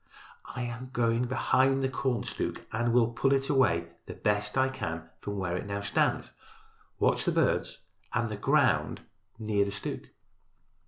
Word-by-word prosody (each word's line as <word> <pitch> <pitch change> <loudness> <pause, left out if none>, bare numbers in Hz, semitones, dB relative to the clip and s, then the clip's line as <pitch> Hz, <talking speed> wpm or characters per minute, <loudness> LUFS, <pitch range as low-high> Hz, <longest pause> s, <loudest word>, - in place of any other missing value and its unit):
"I 125 - -2
am 120 +1 -5
going 115 0 +2
behind 135 +1 +2
the - - +3
corn 130 -3 -1
stook - - -4
and 120 +2 0
will 120 -1 +4
pull 135 +3 +2
it 135 0 0
away 85 -12 +3 0.2
as - - -7
best 105 +3 0
I 130 0 +4
can 80 -10 -5
from 100 0 -5
where 90 -2 -1
it 90 - -4
now 100 0 -3
stands. 100 - 0 0.7
Watch - - +2
the - - +1
birds - - +1 0.3
and 115 0 0
the 110 - -4
ground 105 - +2 0.4
near 105 -2 +1
the 100 - -3
stook." 105 - -5
115 Hz, 165 wpm, -29 LUFS, 100-130 Hz, 0.7 s, will